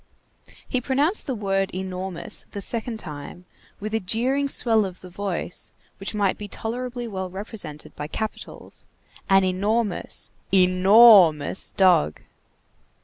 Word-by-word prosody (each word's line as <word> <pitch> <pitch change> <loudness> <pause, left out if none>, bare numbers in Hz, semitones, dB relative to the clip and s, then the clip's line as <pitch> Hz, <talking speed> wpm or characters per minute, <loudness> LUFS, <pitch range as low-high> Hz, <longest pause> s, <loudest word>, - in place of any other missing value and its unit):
He 255 - -1
pronounced 285 - 0
the 260 - -2
word 195 -2 -1
enormous 185 -1 -2
the 205 - -4
second 230 +2 -2
time 155 -1 -9 0.3
with 215 +1 -5
a 225 - +2
jeering 255 +8 0
swell 225 -5 +3
of 185 -2 -7
the 180 - -12
voice 190 -2 -3 0.3
which 195 +2 -5
might 200 -2 0
be 205 - -6
tolerably 245 +3 -5
well 190 -3 -5
represented 190 -6 -7
by 145 - -5
capitals: 220 +7 -7 0.4
"an 195 0 +5
enormous, 200 +3 -1 0.2
ENORMOUS 185 -2 +6
dog." 180 - +3
195 Hz, 125 wpm, -24 LUFS, 185-225 Hz, 0.4 s, ENORMOUS